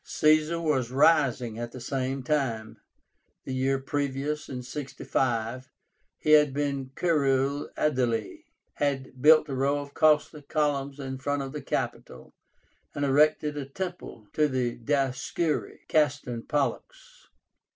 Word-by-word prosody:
Caesar 155 +2 +2
was 145 -7 0
rising 130 -5 +3
at 120 0 -5
the 130 - -7
same 130 +1 -3
time. 125 -6 -1 0.6
The 130 - -5
year 135 +1 +1
previous 140 +2 -2
(65) 130 -2 -3 0.5
he 155 - 0
had 150 -3 +6
been 140 -2 -2
Curule 140 -4 +1
Aedile, 120 -7 0 0.4
had 135 -3 -2
built 155 +2 +7
a 140 - -4
row 135 +2 +1
of 145 0 -7
costly 150 -1 +3
columns 145 -1 -1
in 130 -1 -5
front 145 0 -1
of 135 - -6
the 150 0 -6
Capitol, - - -4 0.6
and 145 - 0
erected 150 +2 +3
a 145 -2 -4
temple 175 - -6
to 150 -1 +3
the 125 -3 -1
Dioscúri 135 +5 -1
(Castor 145 -4 +1
and 115 -1 -8
Pollux). - - -3
140 Hz, 130 wpm, -27 LUFS, 130-150 Hz, 0.6 s, built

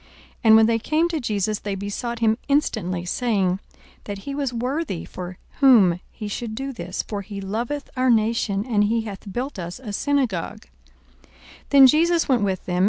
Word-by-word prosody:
42:007:004 - - -26 0.4
And 220 0 +8
when 220 0 +7
they 230 0 +2
came 315 +8 +1
to 325 -2 -2
Jesus, 215 -4 -1
they 200 -1 -4
besought 205 +5 -4
him 220 -1 +3
instantly, 195 -11 0
saying, 190 -3 0 0.5
That 205 -1 -5
he 275 +8 -6
was 275 -2 -2
worthy 250 - -3
for 180 0 -8 0.2
whom 215 -11 +6
he 215 - -7
should 220 +2 -4
do 270 +3 -4
this: 185 -4 -4
42:007:005 - - -28
For 205 -2 -3
he 200 0 -7
loveth 235 +9 -3
our 255 0 +2
nation, 220 -3 +1
and 210 -5 +2
he 225 +2 +1
hath 205 -2 -8
built 245 0 -4
us 175 +5 -6
a 220 -6 -7
synagogue. 255 - -1 0.6
42:007:006 - - -27 0.4
Then 275 -2 +8
Jesus 330 +5 +4
went 255 -4 +2
with 190 -2 -1
them. 180 -1 -1
220 Hz, 190 wpm, -23 LUFS, 195-260 Hz, 0.6 s, And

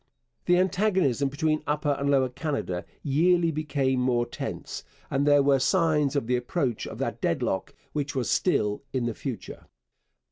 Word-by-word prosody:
The 180 0 +4
antagonism 185 - +2
between 155 +2 0
Upper 150 0 0
and 140 0 -1
Lower 135 -2 +3
Canada 125 - -3 0.2
yearly 165 +4 +3
became 140 -4 0
more 125 -1 +2
tense, 120 - -6 0.3
and 140 +2 +1
there 145 -1 +6
were 135 -1 +4
signs 150 -3 +2
of 140 - 0
the 125 +2 +1
approach 125 -1 -2
of - - -7
that - - -3
deadlock 95 - -1 0.2
which 145 -2 -2
was 125 -4 -1
still 105 - +1
in 130 -3 0
the 120 - -1
future. 125 0 -7
140 Hz, 155 wpm, -27 LUFS, 130-155 Hz, 0.3 s, there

